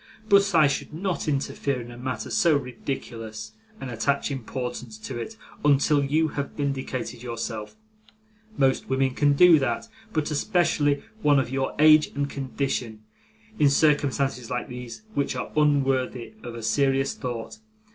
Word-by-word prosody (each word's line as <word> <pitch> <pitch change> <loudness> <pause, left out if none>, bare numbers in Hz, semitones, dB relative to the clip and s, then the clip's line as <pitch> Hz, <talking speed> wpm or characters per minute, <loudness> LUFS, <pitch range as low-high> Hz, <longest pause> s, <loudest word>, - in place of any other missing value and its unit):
But 200 -2 +4
I 155 -2 +7
should 140 +1 -1
not 185 0 -2
interfere 140 -2 -1
in 120 0 -8
a - - -10
matter 130 0 -4
so 170 -9 +4
ridiculous, 115 -4 -6 0.3
and 135 -2 -6
attach 140 +5 0
importance 125 -3 -5
to 110 +2 -6
it, 220 - -6 0.3
until 145 0 +4
you 155 +3 +2
have 140 -1 -4
vindicated 135 -4 -3
yourself. 115 - -5 0.8
Most 135 -1 +2
women 130 0 +2
can 145 +2 +3
do 170 +1 +7
that, 130 - -2 0.2
but 155 -3 -1
especially 150 -4 +1 0.2
one 145 -5 +4
of 130 -2 0
your 135 0 -1
age 155 0 +7
and 140 0 0
condition, 130 -5 -3 0.6
in 145 -2 +6
circumstances 140 -4 +1
like 125 -1 -3
these, 125 - -8
which 140 -2 -1
are 125 - -4
unworthy 135 - +1
of 120 - -7
a 115 - -7
serious 135 +2 +2
thought. 120 - -6
135 Hz, 145 wpm, -25 LUFS, 125-145 Hz, 0.8 s, I